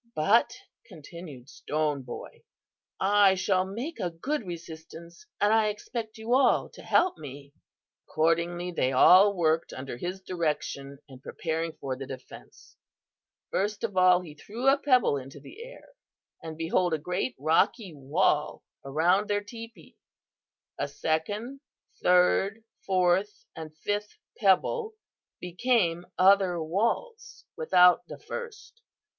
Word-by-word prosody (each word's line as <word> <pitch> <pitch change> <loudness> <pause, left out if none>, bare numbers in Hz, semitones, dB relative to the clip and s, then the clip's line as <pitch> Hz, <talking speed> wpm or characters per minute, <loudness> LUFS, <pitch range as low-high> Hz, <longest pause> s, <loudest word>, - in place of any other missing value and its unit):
"'But,' 200 +9 +3 0.3
continued 150 -4 -11
Stone 150 -1 -2
Boy, 125 -2 -9 0.6
'I 200 0 +4
shall 185 0 +1
make 240 - -6
a 180 - -1
good 220 - -4
resistance, 170 - -10
and 205 +1 +3
I 220 -1 +3
expect 220 +1 -5
you 220 +2 -2
all 265 +1 +3
to - - -13
help 365 0 +2
me.' 140 -1 -10 0.5
"Accordingly 170 +2 0
they 135 -6 0
all 190 +9 +7
worked 160 -2 +1
under 130 -2 -7
his 180 +8 -5
direction 150 -6 -3
in 130 -3 -13
preparing 160 +3 -4
for 130 -1 -5
the 135 +1 -8
defence. 130 -1 -12 0.7
First 205 +1 -2
of 210 -4 -3
all, 185 -1 +5
he 165 -4 -11
threw 225 - -6
a 275 +1 +6
pebble 255 - +3
into 135 +1 -9
the 385 - -11
air, - - -13 0.5
and 160 -1 -8
behold 165 +1 +1
a - - -2
great 180 - -3
rocky 180 +4 +1
wall 150 +2 0 0.2
around 175 +9 +1
their 205 0 0
teepee. 230 +2 -12 0.8
A - - -1
second, 205 +12 -3 0.4
third, 190 +4 +3 0.2
fourth 185 +2 +1
and 155 -1 -9
fifth 205 +5 -3 0.2
pebble 430 - +2 0.4
became 180 -2 0
other 190 -2 +4
walls 235 - -3
without 205 - +4
the - - -9
first. 465 0 -9
180 Hz, 125 wpm, -27 LUFS, 160-215 Hz, 0.8 s, all